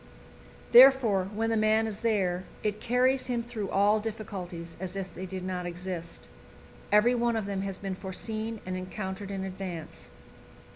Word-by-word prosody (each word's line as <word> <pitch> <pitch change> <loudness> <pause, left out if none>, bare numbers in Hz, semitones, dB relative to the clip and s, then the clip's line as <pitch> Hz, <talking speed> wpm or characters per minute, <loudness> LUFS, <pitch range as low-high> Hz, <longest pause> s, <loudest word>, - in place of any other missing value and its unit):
Therefore, 240 -7 +7
when 225 +2 -1
the - - +2
man 215 +1 +3
is 215 -2 -4
there, 190 -6 0 0.2
it 210 0 -1
carries 255 +2 +2
him 240 -2 -1
through 225 -5 -5
all 205 +2 +3
difficulties 190 -6 -6
as 190 0 -5
if 190 -1 -5
they 185 - -6
did 185 0 -5
not 180 -1 -3
exist; 175 -1 -6 0.6
every 210 +4 +5
one 240 -1 +1
of 220 -2 -1
them 200 -1 -2
has 195 -1 -3
been 195 -1 -4
foreseen 215 +4 -4
and 185 0 -3
encountered 190 +1 -5
in 195 -1 -3
advance. 185 -4 -7
200 Hz, 160 wpm, -29 LUFS, 185-225 Hz, 0.6 s, Therefore